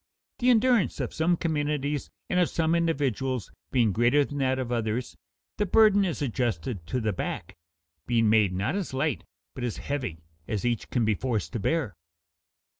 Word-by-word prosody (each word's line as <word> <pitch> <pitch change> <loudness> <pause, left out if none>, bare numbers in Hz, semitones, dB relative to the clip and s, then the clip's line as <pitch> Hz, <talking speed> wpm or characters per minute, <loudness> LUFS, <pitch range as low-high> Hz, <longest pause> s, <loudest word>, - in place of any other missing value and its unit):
The 250 0 +3
endurance 240 -3 +3
of - - -3
some 170 +2 +2
communities 150 -3 -1 0.2
and 180 - +1
of 175 - +3
some 165 0 +1
individuals 135 - 0 0.2
being 120 -5 +3
greater 120 +7 +3
than 145 +1 -6
that 130 -1 +1
of 125 -2 -3
others, 115 +1 -2 0.4
the 210 - 0
burden 205 -1 +5
is 165 -5 -2
adjusted 115 - -2
to 130 - -1
the 110 -3 0
back, - - -4 0.5
being 115 -2 +3
made 105 -3 +4
not 100 - -1
as 190 -9 -3
light 150 +3 0 0.3
but 130 - -6
as 120 -3 -2
heavy 125 - -4 0.2
as 105 +1 -2
each 120 -3 -1
can 120 -3 +1
be 110 - +3
forced 110 -2 -2
to 115 - -2
bear. 135 0 0
130 Hz, 175 wpm, -27 LUFS, 115-160 Hz, 0.5 s, burden